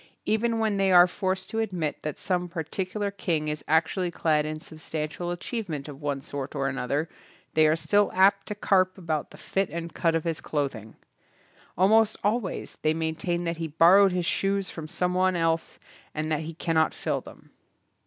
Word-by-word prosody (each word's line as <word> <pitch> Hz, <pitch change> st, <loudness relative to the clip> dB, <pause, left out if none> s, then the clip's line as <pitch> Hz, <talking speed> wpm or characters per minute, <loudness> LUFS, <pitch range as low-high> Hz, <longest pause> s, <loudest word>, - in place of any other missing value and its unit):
Even 225 Hz, +2 st, +1 dB
when 220 Hz, -2 st, +1 dB
they 195 Hz, -1 st, +3 dB
are 175 Hz, -1 st, +9 dB
forced 185 Hz, +1 st, -2 dB
to 225 Hz, -, -1 dB
admit 180 Hz, -9 st, -2 dB
that 150 Hz, -2 st, -4 dB
some 180 Hz, -2 st, -1 dB
particular 185 Hz, +5 st, -3 dB
king 165 Hz, -6 st, -1 dB
is 150 Hz, -1 st, -4 dB
actually 165 Hz, +3 st, +2 dB
clad 155 Hz, -3 st, +1 dB
in 155 Hz, 0 st, -4 dB
substantial 155 Hz, +2 st, -5 dB
achievement 175 Hz, -, -4 dB
of 145 Hz, -1 st, -10 dB
one 145 Hz, -2 st, -2 dB
sort 140 Hz, +1 st, -6 dB
or 135 Hz, -1 st, 0 dB
another, 135 Hz, +4 st, -1 dB, 0.5 s
they 155 Hz, 0 st, +5 dB
are 155 Hz, -, +4 dB
still 205 Hz, +5 st, +2 dB
apt 195 Hz, +1 st, +4 dB
to 210 Hz, -, -3 dB
carp 185 Hz, -2 st, +2 dB
about 160 Hz, -5 st, -2 dB
the -, -, -14 dB
fit 195 Hz, -1 st, -1 dB
and 170 Hz, 0 st, -5 dB
cut 165 Hz, -2 st, +1 dB
of 165 Hz, -, 0 dB
his 165 Hz, -2 st, -2 dB
cloth 145 Hz, -3 st, -1 dB
ing. 110 Hz, -1 st, -11 dB, 0.8 s
Almost 215 Hz, +4 st, +4 dB
always 210 Hz, -1 st, -2 dB
they 155 Hz, 0 st, +2 dB
maintain 165 Hz, +2 st, -1 dB
that 170 Hz, -1 st, -2 dB
he 165 Hz, -1 st, -3 dB
borrowed 180 Hz, +6 st, +6 dB
his 180 Hz, -1 st, -1 dB
shoes 195 Hz, +1 st, 0 dB
from 160 Hz, -2 st, -7 dB
some 180 Hz, +3 st, -1 dB
one 185 Hz, 0 st, +2 dB
else 165 Hz, -1 st, 0 dB, 0.4 s
and 155 Hz, +1 st, -2 dB
that 155 Hz, -, +1 dB
he 160 Hz, +1 st, -6 dB
cannot 160 Hz, -1 st, +1 dB
fill -, -, -2 dB
them. -, -, -15 dB
170 Hz, 185 wpm, -27 LUFS, 155-190 Hz, 0.8 s, are